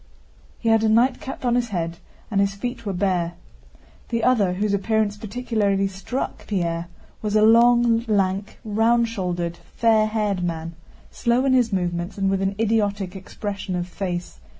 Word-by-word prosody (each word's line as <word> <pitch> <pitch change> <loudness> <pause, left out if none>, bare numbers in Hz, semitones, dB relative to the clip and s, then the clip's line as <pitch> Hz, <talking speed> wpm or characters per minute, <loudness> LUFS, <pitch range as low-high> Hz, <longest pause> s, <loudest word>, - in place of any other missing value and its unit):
He 230 - -1
had 225 0 +4
a 220 - +3
nightcap 250 +3 +1
on 240 - +2
his 240 -1 +1
head 170 -3 -3 0.3
and 200 -2 +2
his 200 0 +1
feet 230 +1 -5
were 200 - -1
bare. 180 -2 0 0.8
The 230 -1 -1
other, 210 -8 +3
whose 205 +2 0
appearance 210 +1 +1
particularly 205 -3 0
struck 195 +7 -5
Pierre, 170 -4 -1 0.3
was 210 -1 -2
a 215 - +5
long, 235 +1 +5
lank, 200 -1 0
round 230 +2 +3
shouldered, 175 -5 -3
fair 220 +1 +2
haired 210 -4 -1
man, 165 -1 -3 0.4
slow 240 +2 +1
in 265 - +3
his 245 -3 +3
movements 175 -1 -2
and 195 -1 +1
with 195 0 0
an 195 +1 0
idiotic 205 -4 0
expression 200 0 -5
of 175 0 -2
face. 175 - -5
205 Hz, 160 wpm, -23 LUFS, 185-225 Hz, 0.8 s, a